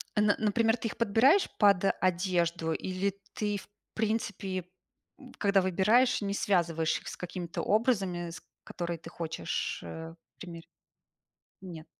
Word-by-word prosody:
н 210 0 +3
на 210 - +5
э, - - -7
например, 225 +2 +2
ты 225 - -3
их - - -9
подбираешь 235 - +4
под 200 -2 +5 0.2
одежду 175 -3 +1
или 190 +3 -2 0.2
ты, 210 -1 -1
в 200 - -12 0.2
принципе, 205 -4 -2 0.6
м, - - -13
когда 200 -2 +3
выбираешь, 210 +8 +3
не 200 -1 -1
связываешь 170 -5 +1
их - - -14
с - - -6
какими-то 180 -1 -5
образами, 195 -6 +1
с - - -9 0.2
которые 170 -1 -4
ты 165 - -10
хочешь, 160 - -3
э, 160 - -7 0.2
примерить? 170 -3 -9 0.9
Нет. 170 -4 -9
190 Hz, 145 wpm, -30 LUFS, 170-210 Hz, 0.9 s, на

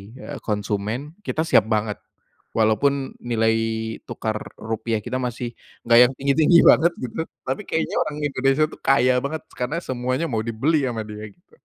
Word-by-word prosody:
eee, - - -8
konsumen 105 +6 -3
kita 160 -5 -2
siap 110 -9 +4
banget. 105 -1 -1 0.6
Walaupun 130 +5 +1
nilai 115 -2 +1 0.5
tukar 110 -1 -3 0.2
rupiah 110 -1 -3
kita 130 +1 -3
masih 120 -1 -3 0.3
enggak 115 0 +6
yang - - -5
tinggi-tinggi 150 +5 +4
banget, 170 +2 +6
gitu, 125 +6 -5 0.2
tapi 130 +1 -2
kayaknya 160 - -1
orang 150 - -5
Indonesia 135 +1 +2
tuh - - -12
kaya 130 -2 +3
banget, 155 +4 -4 0.2
karena 130 +7 -1
semuanya 130 +4 -2
mau 110 - 0
dibeli 130 +6 0
sama 115 -3 -3
dia, 105 0 -8
gitu. 175 - -21
125 Hz, 155 wpm, -23 LUFS, 110-140 Hz, 0.6 s, enggak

